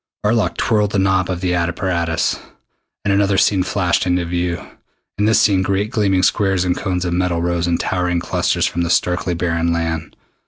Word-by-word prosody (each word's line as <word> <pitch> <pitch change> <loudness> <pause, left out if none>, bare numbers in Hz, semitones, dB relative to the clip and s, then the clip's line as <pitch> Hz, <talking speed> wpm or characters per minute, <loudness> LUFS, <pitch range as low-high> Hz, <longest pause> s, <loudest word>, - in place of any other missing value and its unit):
Arlok 110 +1 +1
twirled 105 -3 +1
the - - +1
knob 95 -1 +1
of 90 -1 -3
the 90 -1 0
apparatus, 85 -1 -1 0.7
and 100 - +2
another 100 0 +2
scene 95 -1 +3
flashed 90 -1 0
into 90 -1 +1
view. 85 0 -2 0.6
In 105 - +2
this 110 +1 +4
scene 100 -3 +3
great 100 +3 -1
gleaming 100 -5 +1
squares 95 -4 +2
and 90 -1 +1
cones 90 -3 -2
of 85 - -1
metal 90 -1 0
rose 85 0 0
in 85 -1 +1
towering 90 -1 -1
clusters - - 0
from 85 - -2
the 85 - -1
starkly 90 0 0
barren 85 -1 0
land. 80 -2 -3
90 Hz, 185 wpm, -18 LUFS, 85-95 Hz, 0.7 s, this